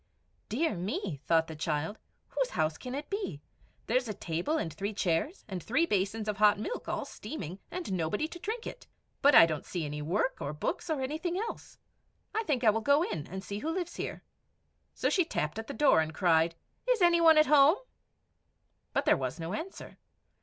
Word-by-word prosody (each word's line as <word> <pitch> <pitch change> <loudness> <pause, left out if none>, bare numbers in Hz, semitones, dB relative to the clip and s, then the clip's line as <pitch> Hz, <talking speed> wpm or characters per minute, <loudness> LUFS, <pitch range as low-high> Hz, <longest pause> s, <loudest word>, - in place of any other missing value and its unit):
"Dear 310 +7 +1
me," 185 - -3
thought 165 -1 +4
the 160 - -8
child, 155 +5 -2 0.3
"whose - - 0
house 155 - 0
can 250 +6 -6
it 290 +1 -5
be! 395 - -3 0.5
There 240 - +2
is 255 -1 -1
a 215 - -4
table 175 - -1
and 165 - -3
three 200 +5 -4
chairs, 190 - -1
and 190 -4 -5
three 265 - +2
basins 210 - -1
of 210 -2 -1
hot 210 0 +5
milk, 350 - -4
all - - -2
steaming, 185 - -7
and 350 - -4
nobody 185 - 0
to 345 - -9
drink 445 +5 -4
it. - - -8 0.3
But 285 +1 +6
I - - +10
don't 155 -3 -3
see 175 -4 -4
any 150 0 -4
work 185 - 0
or 140 - -3
books, 150 - -3
or 305 -4 0
anything 315 +7 -2
else. 455 +4 -5 0.6
I 445 - +1
think 265 -7 0
I 220 - +7
will 225 +2 -1
go 285 +6 +4
in 155 - -4
and 190 +1 -6
see 200 +1 -5
who 310 - -3
lives 350 0 -3
here." - - -5 0.7
So - - 0
she 370 - +4
tapped 180 - -2
at 225 - -6
the - - -4
door, 285 - +4
and 155 0 -4
cried, 165 -1 +3 0.3
"Is 480 -7 +3
any 340 -1 +5
one 325 -1 +7
at 305 - +7
home?" 295 +4 +6 1.2
But - - +1
there - - +5
was - - -3
no 165 +3 -4
answer. 345 - -7
220 Hz, 205 wpm, -30 LUFS, -, 1.2 s, I